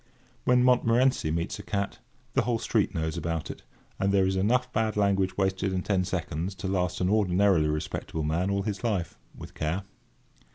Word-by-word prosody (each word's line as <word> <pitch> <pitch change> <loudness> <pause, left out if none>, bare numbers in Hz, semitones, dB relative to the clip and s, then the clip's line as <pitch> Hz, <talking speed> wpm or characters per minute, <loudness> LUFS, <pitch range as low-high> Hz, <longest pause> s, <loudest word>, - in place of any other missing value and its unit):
When 125 0 +4
Montmorency 125 -4 +3
meets 85 +3 -2
a - - -5
cat, 100 -1 -3 0.3
the - - +3
whole 120 0 0
street 110 -3 0
knows 80 -1 -2
about 85 -2 -3
it; - - -11 0.4
and 95 0 +2
there 95 -1 +4
is 95 0 0
enough 125 +6 +1
bad 110 -1 0
language 100 -2 +1
wasted 95 0 0
in 90 -1 -1
ten 95 -3 +1
seconds 90 0 -3
to 95 +1 -5
last 90 -2 -1
an 90 - +2
ordinarily 95 -5 +3
respectable 75 +1 -3
man 85 +5 0
all 100 0 0
his 105 +1 -4
life, 100 -8 -2 0.2
with - - -10
care. 80 +5 -2
95 Hz, 180 wpm, -27 LUFS, 90-105 Hz, 0.4 s, When